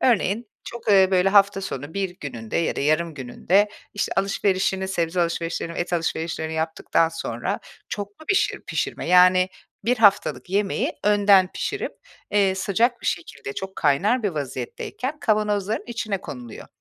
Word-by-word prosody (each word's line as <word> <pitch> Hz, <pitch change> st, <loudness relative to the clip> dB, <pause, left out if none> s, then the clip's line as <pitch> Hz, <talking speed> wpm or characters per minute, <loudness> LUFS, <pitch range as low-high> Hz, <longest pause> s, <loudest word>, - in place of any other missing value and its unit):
Örneğin 225 Hz, -2 st, +1 dB, 0.2 s
çok, 235 Hz, -1 st, -8 dB
eee, 195 Hz, -2 st, +6 dB
böyle, 185 Hz, 0 st, +4 dB
hafta 200 Hz, 0 st, +4 dB
sonu 145 Hz, -4 st, -6 dB
bir 190 Hz, -2 st, -2 dB
gününde 115 Hz, -6 st, -5 dB
ya 165 Hz, -, 0 dB
da -, -, -2 dB
yarım 155 Hz, +2 st, +1 dB
gününde, 175 Hz, +10 st, +1 dB, 0.3 s
işte, 205 Hz, -, -1 dB
alışverişini, 190 Hz, -1 st, +1 dB
sebze 175 Hz, -1 st, 0 dB
alışverişlerini, 170 Hz, 0 st, -2 dB
et 175 Hz, -, -3 dB
alışverişlerini 160 Hz, -1 st, -2 dB
yaptıktan 160 Hz, +1 st, +1 dB
sonra 165 Hz, -, -3 dB, 0.3 s
çoklu 205 Hz, +8 st, -6 dB
bişir 390 Hz, -, +1 dB
pişirme. -, -, -3 dB
Yani, 185 Hz, +1 st, +6 dB, 0.4 s
1 245 Hz, +2 st, +2 dB
haftalık 205 Hz, -3 st, +3 dB
yemeği 200 Hz, 0 st, 0 dB
önden 200 Hz, -2 st, +5 dB
pişirip, -, -, -3 dB, 0.4 s
eee, 195 Hz, -2 st, +3 dB
sıcak 230 Hz, +6 st, +1 dB
bir -, -, -7 dB
şekilde, 165 Hz, -5 st, -3 dB
çok 190 Hz, +4 st, -6 dB
kaynar 195 Hz, -, +2 dB
bir 205 Hz, -, +2 dB
vaziyetteyken 150 Hz, -, -5 dB
kavanozların 210 Hz, -2 st, 0 dB
içine 215 Hz, -5 st, -3 dB
konuluyor. 125 Hz, -4 st, -9 dB
190 Hz, 145 wpm, -23 LUFS, 165-205 Hz, 0.4 s, eee